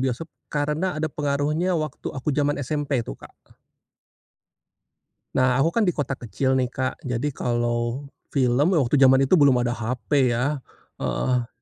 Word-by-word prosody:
bioskop, 130 +5 -2 0.2
karena 150 +4 -1
ada 155 -1 -2
pengaruhnya 150 +5 0
waktu 155 -3 -4
aku 140 +2 -3
zaman 145 +1 +1
SMP 145 -2 -1
tuh, - - -8
Kak. - - -13 2.0
Nah, 130 -1 +3
aku 160 +5 +3
kan 230 - +2
di 175 - +1
kota 145 -2 -2
kecil 130 +4 0
nih, 125 - +1
Kak, 130 +1 -3
jadi 125 +4 -1
kalau 120 +1 -1 0.3
film 135 +7 +3
waktu 140 -3 +2
jaman 130 0 +6
itu 155 +6 +4
belum 135 -4 +5
ada 120 - 0
HP, 125 +2 0
ya. 140 +4 0 0.4
Heeh. 125 -2 0
135 Hz, 150 wpm, -24 LUFS, 125-150 Hz, 2.0 s, jaman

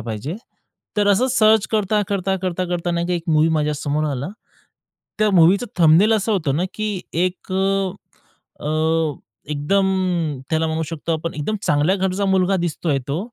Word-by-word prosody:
पाहिजे. 115 - -5 0.6
तर 205 -1 +2
असं 205 +6 +3
सर्च 220 -3 +4
करता-करता, 200 -2 0
करता-करता 180 -1 -2
नाही 170 0 -1
का, 180 - -1
एक 175 - -1
मूव्ही 155 +1 +4
माझ्यासमोर 150 -1 -1
आला. 140 +3 -3 0.9
त्या 215 -1 +3
मूव्हीचं 190 +6 +4
थंबनेल 170 +7 +5
असं 220 +1 +1
होतं 155 -8 0
ना, 175 - 0
की 215 -3 -3 0.3
एक 185 +1 -7
अ, 195 0 +1 0.7
अ, 155 0 +1 0.4
एकदम 190 +7 +1 0.6
त्याला 160 0 +1
म्हणू 160 0 -1
शकतो 165 0 -3
आपण 160 +1 -3
एकदम 185 +9 -2
चांगल्या 150 +5 +2
घरचा 190 +1 -1
मुलगा 190 0 +2
दिसतोय 165 -4 -1
तो 140 +3 -1
175 Hz, 150 wpm, -21 LUFS, 155-195 Hz, 0.9 s, थंबनेल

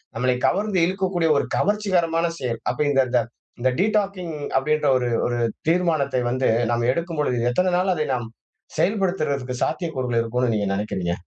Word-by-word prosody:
நம்மளை 125 +2 +1
கவர்ந்து 205 -1 +1
இழுக்கக்கூடிய 185 -3 0
ஒரு - - +1
கவர்ச்சிகரமான 180 -5 +1
செயல். 120 -3 -3
அப்ப 125 - -3
இந்த 135 -1 +4 0.6
இந்த 130 - +2
டீடாக்கிங்க் 195 -5 0 0.2
அப்டின்ற 150 +2 +1
ஒரு 125 -1 -1 0.2
ஒரு 120 0 -1 0.3
தீர்மானத்தை 155 -7 +1
வந்து 130 +1 0 0.2
நம்ம 120 0 +1
எடுக்கும்பொழுது, 160 -7 -1
எத்தனை 180 +7 +1
நாள் 185 0 +2
அதை 155 -3 -1
நாம் 120 -2 -2 0.5
செயல்படுத்துறதுக்கு 155 - 0
சாத்தியக்கூறுகள் 130 -8 -1
இருக்கும்னு 120 +1 0
நீங்க 100 -1 0
நெனைக்கிறீங்க? 95 -4 -2
150 Hz, 140 wpm, -23 LUFS, 125-180 Hz, 0.6 s, இந்த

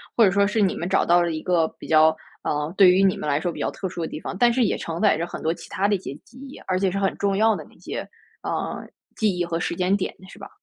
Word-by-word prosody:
或 230 - +5
者 200 - +6
说 200 +1 +3
是 210 +1 0
你 190 - +2
们 175 - -4
找 190 - +2
到 175 0 +4
了 170 - -1
一 155 - -4
个 170 -2 +2
比 - - -9
较， 160 0 +5 0.3
呃， 150 +2 -2
对 190 -3 +8
于 185 +2 +3
你 195 -1 +3
们 - - -5
来 145 +1 +1
说 175 - -1
比 - - -9
较 - - -1
特 190 - -5
殊 175 - -6
的 160 - -2
地 - - -7
方， 180 - -6
但 240 +1 +4
是 255 0 +2
也 205 - +1
承 165 +2 -5
载 210 -6 +4
着 165 - -2
很 175 - -8
多 160 - 0
其 170 - -8
他 200 +2 +1
的 205 - +2
一 - - -3
些 160 - -7
记 245 - -19
忆， 275 0 -10
而 185 - +1
且 190 -1 +1
是 195 - -2
很 195 - 0
重 200 -1 0
要 220 +1 +3
的 - - -8
那 - - -22
些， - - -6 0.4
呃， - - -3 0.3
记 210 -4 +1
忆 175 - 0
和 170 -1 -2
时 170 - -2
间 185 +3 +1
点 190 - -3 0.2
是 - - -13
吧？ - - -10
185 Hz, 340 characters per minute, -23 LUFS, 170-200 Hz, 0.4 s, 对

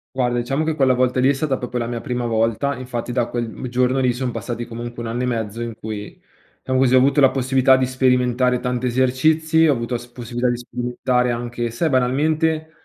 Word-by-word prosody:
Guarda, 125 -2 0
diciamo 135 +5 -1
che 160 0 -1
quella 135 -3 +3
volta 125 0 +1
lì 130 - +4
è 140 - +4
stata 135 -1 -1
proprio 125 0 -5
la 120 -1 -2
mia 120 0 -3
prima 125 -2 -3
volta, 115 +4 0
infatti 125 -1 -5
da 120 -1 +1
quel 120 -1 -3
m 130 - -7
giorno 125 +2 +1
lì 125 -2 +2
son 125 0 -3
passati 120 +1 -5
comunque 120 +1 -7
1 115 - -4
anno 120 +2 -2
e - - +1
mezzo 115 -3 -3
in 115 -1 -4
cui, 105 -1 -7 0.4
diciamo 130 0 0
così, 130 -1 +4
ho - - +7
avuto 140 +3 +3
la 135 -2 +6
possibilità 130 0 +3
di 130 0 +1
sperimentare 125 -1 +1
tanti 125 0 -2
esercizi, 155 +6 +2
ho 145 - +4
avuto 120 0 -3
la - - -2
s 120 - -12
possibilità 120 0 -3
di 120 - -2
sperimentare 125 +1 -1
anche, 120 0 -3
sai, 120 +8 -1
banalmente, 155 +5 +1
125 Hz, 225 wpm, -21 LUFS, 120-130 Hz, 0.4 s, ho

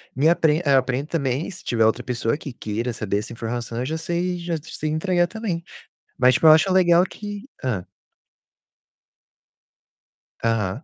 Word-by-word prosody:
me 150 +5 +4
apre 160 -1 +3
eu 140 -1 +5
aprendo 130 +3 0
também, 140 -1 -1
se 180 - -10
tiver 115 -2 +2
outra 110 - +2
pessoa 120 +1 -1
que 140 -5 -8
queira 115 +2 -3
saber 105 -2 -2
essa 110 - -7
informação, 115 0 -4
eu 125 - -2
já 160 +3 -2
sei 175 +2 -2
já 170 -1 -3
sei 155 -1 -4
entregar 175 +2 +1
também. 210 -6 -3 0.6
Mas 125 0 +5
tipo 140 - +3
eu 155 - +10
acho 170 +4 +4
legal 175 -1 +5
que 205 +5 -8 0.2
hã. 105 -9 -1 2.6
Aham, 115 - 0
145 Hz, 160 wpm, -23 LUFS, 120-175 Hz, 2.6 s, eu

